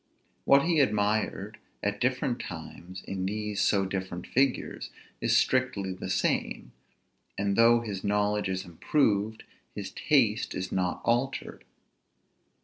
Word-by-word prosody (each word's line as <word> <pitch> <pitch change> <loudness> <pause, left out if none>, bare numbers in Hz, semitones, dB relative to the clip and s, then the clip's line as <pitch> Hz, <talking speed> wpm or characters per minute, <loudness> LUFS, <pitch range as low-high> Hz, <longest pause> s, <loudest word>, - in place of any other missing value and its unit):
What 140 0 +6
he 165 -2 +2
admired 105 -3 0 0.2
at 100 0 -1
different 130 -1 0
times 90 +2 -8
in 95 -1 -3
these 105 0 -2
so 100 -2 +3
different 95 -2 -4
figures, 135 0 0 0.3
is - - +3
strictly 105 -7 +1
the 95 - -7
same; - - -1 0.7
and 100 0 0
though 115 +1 +6
his 100 -5 -5
knowledge 105 0 +1
is 95 +1 -2
improved, 105 - 0 0.3
his - - -5
taste - - +1
is 95 - -4
not 90 -2 -1
altered. 120 +3 -1
105 Hz, 125 wpm, -28 LUFS, 95-120 Hz, 0.7 s, What